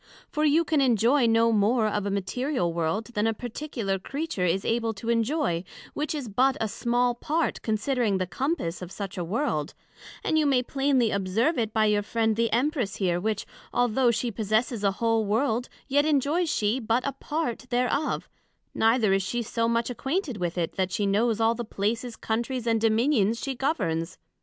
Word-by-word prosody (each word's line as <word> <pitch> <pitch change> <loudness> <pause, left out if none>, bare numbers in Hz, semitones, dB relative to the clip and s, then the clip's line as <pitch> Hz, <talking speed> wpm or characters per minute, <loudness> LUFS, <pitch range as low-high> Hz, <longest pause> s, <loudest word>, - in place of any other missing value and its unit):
For 305 - -1
you 310 +3 +4
can 310 -3 +2
enjoy 245 +1 +3
no 230 0 +4
more 220 +2 +3
of 205 -1 -1
a - - 0
material 200 - -1
world 170 +7 -1
then 210 +1 +1
a 225 - 0
particular 235 -5 -3
Creature 275 - -3
is 180 +3 0
able 230 -1 0
to 225 +3 -6
enjoy, 230 - +1 0.3
which 305 +1 -2
is 280 -5 -4
but 255 +6 +2
a 225 - 0
small 240 +3 +1
part, 310 +7 -1
considering 220 -1 0
the 185 - -1
compass 185 - -2
of 180 0 -7
such 195 -2 -6
a 180 - -3
world; 175 - -2 0.5
and 315 - +2
you 300 - +2
may 260 -3 +3
plainly 270 -3 +1
observe 205 - +1
it 225 -2 -1
by 220 0 +2
your 210 -1 +3
friend 220 +1 0
the 230 +1 +1
Empress 250 -3 0
here, 175 -3 0
which 210 +2 -2 0.3
although 245 +1 +2
she 235 +1 0
possesses 220 +2 0
a 200 -1 +2
whole 225 +1 +1
World, 230 +3 0 0.2
yet 285 +1 +3
enjoys 310 +4 +1
she 215 -1 +1
but 230 +1 0
a 280 - 0
part 275 -4 -3
thereof; 250 +4 0 0.5
neither 225 -3 +3
is 195 - +2
she 240 +5 -2
so 230 +1 -1
much 235 +1 0
acquainted 270 - -2
with 175 -1 -3
it, 170 -2 -2
that 190 -1 0
she 205 0 0
know 210 +4 +2
all 225 0 +3
the 240 +1 -4
places, 225 +3 -2
Countries, 235 +3 -2
and 225 -1 +1
Dominions 225 -1 +2
she 275 - -3
Governs. 185 - -1
230 Hz, 185 wpm, -26 LUFS, 205-260 Hz, 0.5 s, you